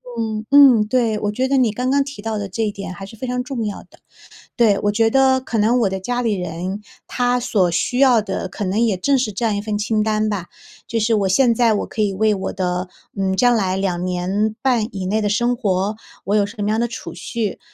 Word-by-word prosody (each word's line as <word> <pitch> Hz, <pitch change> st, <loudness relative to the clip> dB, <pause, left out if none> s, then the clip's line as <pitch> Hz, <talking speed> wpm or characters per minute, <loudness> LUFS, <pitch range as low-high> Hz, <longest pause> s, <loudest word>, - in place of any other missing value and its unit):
嗯 220 Hz, -1 st, -3 dB
嗯， 270 Hz, -7 st, +7 dB
对， 230 Hz, -2 st, +1 dB
我 205 Hz, 0 st, -1 dB
觉 255 Hz, +5 st, -1 dB
得 275 Hz, +1 st, +1 dB
你 245 Hz, -4 st, +3 dB
刚 250 Hz, +4 st, -2 dB
刚 280 Hz, +1 st, +3 dB
提 280 Hz, -6 st, -9 dB
到 220 Hz, 0 st, -3 dB
的 205 Hz, -, -3 dB
这 225 Hz, +5 st, -2 dB
一 210 Hz, -, -1 dB
点 200 Hz, -2 st, -7 dB
还 195 Hz, +2 st, -8 dB
是 200 Hz, -, -12 dB
非 225 Hz, -, -6 dB
常 250 Hz, 0 st, -2 dB
重 250 Hz, -4 st, -4 dB
要 205 Hz, -, -5 dB
的。 -, -, -23 dB, 0.6 s
对， 220 Hz, -5 st, +4 dB
我 205 Hz, -, +1 dB
觉 225 Hz, +2 st, +3 dB
得 265 Hz, +2 st, +3 dB
可 250 Hz, -2 st, -4 dB
能 225 Hz, +4 st, +3 dB
我 215 Hz, -, +2 dB
的 190 Hz, 0 st, -4 dB
家 245 Hz, +6 st, -2 dB
里 230 Hz, -3 st, 0 dB
人， 180 Hz, +2 st, -4 dB, 0.2 s
他 245 Hz, 0 st, 0 dB
所 200 Hz, -7 st, +1 dB
需 175 Hz, +8 st, -1 dB
要 255 Hz, -4 st, +5 dB
的 195 Hz, -2 st, -4 dB
可 205 Hz, -, -5 dB
能 190 Hz, +2 st, -1 dB
也 225 Hz, -4 st, +2 dB
正 275 Hz, +10 st, +2 dB
是 245 Hz, -5 st, -1 dB
这 215 Hz, +5 st, -3 dB
样 215 Hz, -2 st, +1 dB
一 -, -, -1 dB
份 210 Hz, -1 st, -2 dB
清 215 Hz, +1 st, 0 dB
单 215 Hz, 0 st, 0 dB
吧， 200 Hz, -5 st, -3 dB, 0.4 s
就 230 Hz, -, -1 dB
是 225 Hz, +1 st, +2 dB
我 200 Hz, -3 st, +1 dB
现 235 Hz, +5 st, +3 dB
在 230 Hz, -1 st, +3 dB
我 210 Hz, -, -1 dB
可 215 Hz, -, -3 dB
以 205 Hz, -2 st, +1 dB
为 215 Hz, +2 st, +2 dB
我 190 Hz, -, -4 dB
的， 180 Hz, 0 st, -2 dB, 0.3 s
嗯， 190 Hz, -1 st, 0 dB
将 245 Hz, +2 st, +4 dB
来 190 Hz, -4 st, 0 dB
2 180 Hz, -2 st, -1 dB
年 185 Hz, +4 st, -1 dB
半 245 Hz, -5 st, +2 dB
以 190 Hz, -2 st, -4 dB
内 215 Hz, +3 st, 0 dB
的 205 Hz, -, +1 dB
生 240 Hz, +4 st, +1 dB
活， 200 Hz, -2 st, -1 dB, 0.3 s
我 205 Hz, +3 st, +1 dB
有 205 Hz, -, +3 dB
什 205 Hz, +5 st, -8 dB
么 205 Hz, -, 0 dB
样 215 Hz, +1 st, +1 dB
的 235 Hz, -, 0 dB
储 235 Hz, -, -8 dB
蓄 225 Hz, -4 st, -4 dB
215 Hz, 265 characters per minute, -20 LUFS, 195-240 Hz, 0.6 s, 嗯